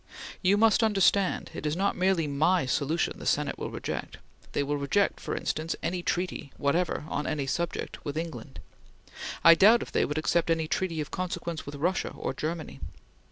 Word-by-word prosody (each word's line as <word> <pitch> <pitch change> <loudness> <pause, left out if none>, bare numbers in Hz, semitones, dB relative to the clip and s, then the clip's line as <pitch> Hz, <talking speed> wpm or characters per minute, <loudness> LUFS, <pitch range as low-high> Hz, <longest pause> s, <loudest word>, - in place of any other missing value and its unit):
You 195 +2 +4
must 220 +1 +4
understand, 200 -3 +2
it - - -6
is 150 0 0
not 195 +3 +1
merely 185 -3 +2
my 150 +3 +2
solution 150 +5 0
the - - -8
Senate - - 0
will - - -3
reject. - - -5 0.4
They 145 - +1
will 145 +1 -1
reject, 145 +9 +1
for - - -4
instance, 160 +2 -2
any 180 0 -1
treaty, 175 -5 -2
whatever, 160 +2 0
on 150 -2 -2
any 145 -3 -1
subject, 170 +5 -3
with 145 +1 -4
England. 160 -4 -6 0.8
I 165 - +10
doubt 215 +7 +6
if - - -11
they - - +2
would 145 - -3
accept 165 +2 +1
any 165 -1 +1
treaty 165 -1 -1
of 150 - -6
consequence 170 -3 -4
with 145 - -6
Russia 175 +6 0
or - - -3
Germany. 160 +4 -4
165 Hz, 180 wpm, -28 LUFS, 150-185 Hz, 0.8 s, I